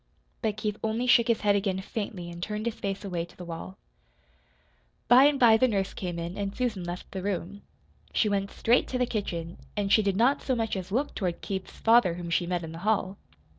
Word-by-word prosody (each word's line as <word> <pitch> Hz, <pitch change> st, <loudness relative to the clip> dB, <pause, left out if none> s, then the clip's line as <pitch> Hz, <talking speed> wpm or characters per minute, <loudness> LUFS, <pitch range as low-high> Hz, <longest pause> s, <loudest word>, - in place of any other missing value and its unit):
But 215 Hz, -3 st, -1 dB
Keith 210 Hz, -1 st, -2 dB
only 220 Hz, +3 st, 0 dB
shook 240 Hz, -1 st, +5 dB
his 230 Hz, -2 st, +2 dB
head 205 Hz, -1 st, +3 dB
again 195 Hz, -2 st, 0 dB
faintly 190 Hz, -3 st, -5 dB
and 170 Hz, 0 st, -9 dB
turned 210 Hz, +3 st, -3 dB
his 235 Hz, -, 0 dB
face 200 Hz, 0 st, -4 dB
away 175 Hz, -3 st, -2 dB
to 170 Hz, -, -14 dB
the 180 Hz, -, -8 dB
wall. 170 Hz, +3 st, -7 dB, 1.3 s
By 250 Hz, +3 st, +8 dB
and 290 Hz, -1 st, +3 dB
by 225 Hz, -3 st, +7 dB
the 255 Hz, -, +4 dB
nurse 195 Hz, -4 st, -1 dB
came 175 Hz, -2 st, -4 dB
in, 170 Hz, +3 st, -5 dB
and 200 Hz, 0 st, -3 dB
Susan 230 Hz, -7 st, -1 dB
left 175 Hz, +1 st, -6 dB
the 190 Hz, -, -4 dB
room. 200 Hz, +1 st, -3 dB, 0.5 s
She 220 Hz, -, +2 dB
went 200 Hz, -1 st, 0 dB
straight 240 Hz, +3 st, +2 dB
to 255 Hz, -, -2 dB
the 250 Hz, -, +2 dB
kitchen, 175 Hz, -7 st, -4 dB, 0.2 s
and 200 Hz, -1 st, +1 dB
she 220 Hz, -, +6 dB
did 195 Hz, -2 st, 0 dB
not 250 Hz, +6 st, +3 dB
so 260 Hz, -, 0 dB
much 225 Hz, -2 st, -1 dB
as 190 Hz, 0 st, -5 dB
look 270 Hz, +7 st, 0 dB
toward 180 Hz, -4 st, -2 dB
Keith's 190 Hz, -1 st, -5 dB
father 225 Hz, -7 st, +4 dB
whom 170 Hz, -1 st, -6 dB
she 175 Hz, 0 st, +1 dB
met 175 Hz, -1 st, -1 dB
in 160 Hz, -, -6 dB
the 165 Hz, -, -8 dB
hall. 200 Hz, -1 st, 0 dB
200 Hz, 225 wpm, -28 LUFS, 180-225 Hz, 1.3 s, By